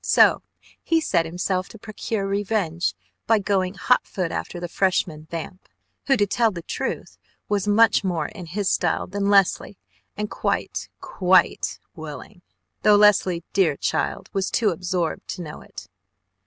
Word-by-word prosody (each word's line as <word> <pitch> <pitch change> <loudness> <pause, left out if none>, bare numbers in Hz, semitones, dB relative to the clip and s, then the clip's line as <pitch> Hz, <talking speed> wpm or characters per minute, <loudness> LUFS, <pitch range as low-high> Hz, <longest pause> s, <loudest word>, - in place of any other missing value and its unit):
So - - +5 0.4
he 330 - +2
set 170 - +1
himself 185 +2 -2
to - - -12
procure 215 -1 -4
revenge 195 -4 -1 0.3
by 225 - +5
going 195 -2 0
hot 250 +5 +2
foot 180 -4 -3
after 175 - -4
the 175 - -4
Freshman 170 -4 0
"vamp" 170 +3 -7 0.4
who, 270 -2 +4
to 205 - +3
tell 230 +3 +2
the 175 -5 -7
truth, - - -4 0.3
was 205 -1 0
much 220 +1 +4
more 170 -5 -1
in 180 -4 -10
his 195 +4 -2
style - - +1
than 200 +1 -2
Leslie 195 - +3 0.4
and 210 0 -2
quite, - - -2
quite 185 -1 +2 0.2
willing 155 +4 -9 0.4
though 210 -1 +6
Leslie, 195 -4 +4
dear 165 -7 +2
child, - - -2
was 195 -1 0
too 220 -3 +2
absorbed 180 -1 -2
to 180 - -5
know 150 -2 -9
it. - - -11
190 Hz, 155 wpm, -23 LUFS, 175-205 Hz, 0.4 s, though